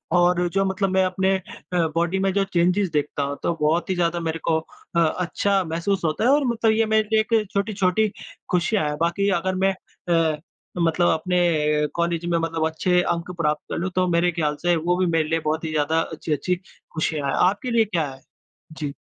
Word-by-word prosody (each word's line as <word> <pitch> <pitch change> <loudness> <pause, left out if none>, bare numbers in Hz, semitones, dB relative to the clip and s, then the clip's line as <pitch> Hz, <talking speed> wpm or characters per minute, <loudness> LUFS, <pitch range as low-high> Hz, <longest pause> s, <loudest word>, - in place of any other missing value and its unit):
और 175 0 +3
जो 195 +2 +1
मतलब 190 +1 0
मैं 190 0 +3
अपने 190 +1 +1
अ, - - -11 0.5
बॉडी 170 +3 +1
में 195 0 +1
जो 200 0 +2
चेंजेज 180 +3 +2
देखता 145 -1 -1
हूँ 140 0 -3
तो - - +1
बहुत 160 +5 +1
ही 190 - +1
ज़्यादा 175 -1 0
मेरे 165 -1 -3
को 160 - +3 0.4
अ, 170 - +4
अच्छा 180 +4 +1
महसूस 170 +4 -2
होता 155 +7 0
है। 245 - +4
और 285 +1 +4
मतलब 230 -2 +2
ये 225 +1 +2
मेरे 220 0 +2
लिए 220 - +4
एक 220 -2 +1
छोटी-छोटी 200 0 +1 0.4
खुशियाँ 180 -2 +1
है। 150 - -2
बाक़ी 170 +4 +1
अगर 185 +2 -2
मैं 195 +1 +2 0.6
अ, 150 - -5 0.4
मतलब 170 +1 +2
अपने 160 -3 +1
कॉलेज़ 170 0 -1
में 170 -1 +1
मतलब 165 -1 -1
अच्छे 180 +3 +1
अंक 170 0 -2
प्राप्त 150 -1 0
कर - - -2
लूँ, 175 +3 -2
तो 185 0 +2
मेरे 175 0 +2
ख्याल 155 -3 -1
से 175 0 +2
वो 170 +2 0
भी 185 - +2
मेरे 165 -3 +1
लिए 165 0 +1
बहुत 155 +1 -2
ही 160 - -3
ज़्यादा 155 +1 +1
अच्छी-अच्छी 160 +2 -2 0.4
खुशियाँ 155 -2 -1
है, 135 - 0 0.2
आपके 205 +6 -4
लिए 230 -1 +4
क्या 170 -7 -1
है? 135 0 -12 0.5
जी। 150 -3 -5
175 Hz, 205 wpm, -23 LUFS, 160-190 Hz, 0.6 s, अ